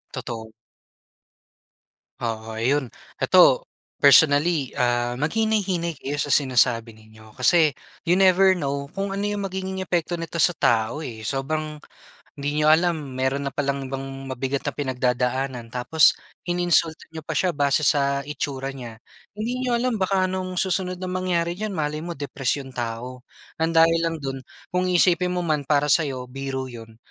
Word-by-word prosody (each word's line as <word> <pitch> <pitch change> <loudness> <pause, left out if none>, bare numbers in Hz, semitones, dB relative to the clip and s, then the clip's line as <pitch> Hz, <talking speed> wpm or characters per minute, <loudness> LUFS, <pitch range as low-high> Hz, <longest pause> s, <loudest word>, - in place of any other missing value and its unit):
Totoo. 110 -2 -6 1.7
Oo 110 -1 -4
'yon. 130 +4 +1 0.3
Ito, - - +5 0.3
personally, 145 0 +5
ah, 120 0 +1
maghinay-hinay 180 -3 0
kayo 140 +2 -4
sa 145 0 -2
sinasabi 120 -4 +2
ninyo 110 0 -17
kasi 160 -4 +3 0.3
you 175 - +4
never 190 0 +5
know 140 -4 -3
kung 195 0 -2
ano 195 - -3
'yong 205 -1 -2
magiging 190 0 -4
epekto 175 -1 -1
nito 165 0 -5
sa 175 +2 +3
tao, 115 +6 +1
eh. 110 -5 -6
Sobrang 150 +4 -2 0.6
hindi 145 +1 -2
niyo 155 0 +4
alam 160 -5 +1
mayroon 135 +2 0
na - - -25
pa - - -2
lang 140 0 -1
ibang 135 0 -6
mabigat 135 +2 -2
na - - -1
pinagdadaanan, 125 -1 -1
tapos 125 +7 +3 0.3
ininsulto 175 -2 +1
niyo 160 - -6
pa 160 - -3
siya, 185 +4 +2
base 145 0 +1
sa 140 -1 +2
itsura 140 -2 -4
niya. 120 -4 -9 0.4
Hindi 240 +4 -3
niyo 245 - +1
alam, 235 -2 0
baka 190 0 +2
anong 185 -1 -4
susunod 185 0 0
na 185 - -3
mangyari 180 -2 0
diyan, 215 -2 -3
malay 150 -1 -2
mo 170 +1 -5
depress 140 -1 -2
'yong 135 - -11
tao. 120 +1 -5 0.3
Ng 160 +1 0
dahil 165 +1 +5
lang 165 0 -2
do'n, 135 -1 -4 0.3
kung 180 0 +1
isipin 180 0 +3
mo 180 - -1
man 150 -4 -1
para 145 0 +2
sa 165 - +5
'yo, 130 -2 -5
biro 135 0 -4
'yon, 115 -2 -11
145 Hz, 160 wpm, -23 LUFS, 130-175 Hz, 1.7 s, Ito